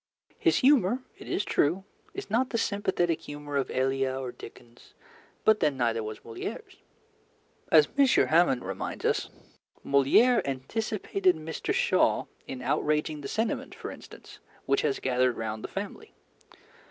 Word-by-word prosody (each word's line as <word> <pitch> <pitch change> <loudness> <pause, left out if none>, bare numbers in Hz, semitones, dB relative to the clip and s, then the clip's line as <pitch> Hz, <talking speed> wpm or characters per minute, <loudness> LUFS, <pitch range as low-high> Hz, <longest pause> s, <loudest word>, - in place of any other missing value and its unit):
His - - +3
humour, 255 -3 +4 0.2
it - - -11
is - - -1
true, 170 +6 +1 0.3
is - - -6
not 250 +4 +2
the 230 - -1
sympathetic 190 -6 0
humour 145 0 -7
of 140 -2 0
Elia 135 0 0
or 130 -2 -4
Dickens; 120 0 -14 0.5
but 220 -1 +5
then 145 -3 +1
neither 115 -2 +1
was 110 0 -6
Molière's. 115 0 -7 0.9
As 155 -2 +7
M. 280 -1 +5
Hamon 165 - +3
reminds 95 0 -5
us, - - +1 0.6
Molière 140 - +4
anticipated 185 - -1
Mr. 160 +1 -4
Shaw - - +2 0.2
in 130 -1 -6
outraging 150 0 0
the 140 - -5
sentiment, 220 +9 -2
for - - -7
instance, - - -13 0.3
which 410 - +2
has 430 -3 0
gathered 125 -1 +1
round 110 -1 -4
the - - -3
family. 205 - -7
150 Hz, 140 wpm, -28 LUFS, 130-215 Hz, 0.9 s, As